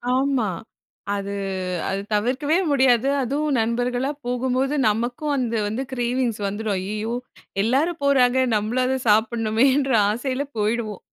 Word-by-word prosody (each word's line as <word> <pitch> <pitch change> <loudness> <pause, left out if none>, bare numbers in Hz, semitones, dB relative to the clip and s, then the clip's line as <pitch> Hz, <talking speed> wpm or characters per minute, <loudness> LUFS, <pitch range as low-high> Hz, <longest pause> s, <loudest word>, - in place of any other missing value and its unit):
ஆமா. 265 -5 +1 0.7
அது 200 0 -4 0.6
அது 195 +1 -1
தவிர்க்கவே 260 +9 +1
முடியாது. 260 -2 +3
அதுவும் 280 +2 0
நண்பர்களா 245 +3 0 0.2
போகும்போது, 255 +3 0
நமக்கும் 240 +7 -1
அந்த 245 -3 -1
வந்து 225 +5 -2
கிரேவிங்ஸ் 245 -2 -1
வந்துரும். 205 0 -2
ஐய்யயோ! 215 +4 -3 0.5
எல்லாரும் 290 +9 +1
போறாங்க, 260 -2 +4 0.2
நம்மளும் 225 +5 0
அது 265 +1 +1
சாப்புட்னுமேன்ற 230 +5 +2 0.2
ஆசையில 255 +5 -2
போயிடுவோம். 215 -1 -1
245 Hz, 115 wpm, -23 LUFS, 220-265 Hz, 0.7 s, போறாங்க